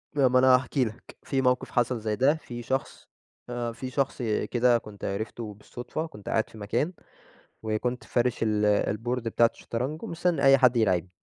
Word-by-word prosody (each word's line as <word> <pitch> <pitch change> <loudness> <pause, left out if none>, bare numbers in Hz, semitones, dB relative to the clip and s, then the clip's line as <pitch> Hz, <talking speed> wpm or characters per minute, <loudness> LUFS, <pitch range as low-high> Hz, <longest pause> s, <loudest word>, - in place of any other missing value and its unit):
ما 130 -2 +4
أنا 130 0 +7
هاحكِي 130 0 +1
لك، 110 +2 -9
في 135 -1 0
موقف 125 -1 +1
حصل 120 -1 +1
زي 105 -1 -2
ده 135 +6 +3
في 120 -6 -8
شخص 135 +3 -3 0.4
آآ، 120 -1 -3
في 130 +3 -6
شخص 135 -1 -1 0.3
كده 120 0 +4
كنت 105 -3 -9
عرفته 110 +2 -4
بالصدفة 120 +9 -6
كنت 105 -11 -10
قاعد 110 - +1
في 110 - -14
مكان، 125 - -1 0.7
وكنت 115 +3 -2
فارِش 120 0 0
ال 105 -1 +2
الboard 120 +3 -2
بتاعة 115 0 +3
الشطرنج 130 +7 -4
ومستنى 170 -3 -1
أي 135 0 +7
حد 125 -2 +4
يلاعبْني، 95 -5 +2
120 Hz, 170 wpm, -27 LUFS, 110-130 Hz, 0.7 s, أنا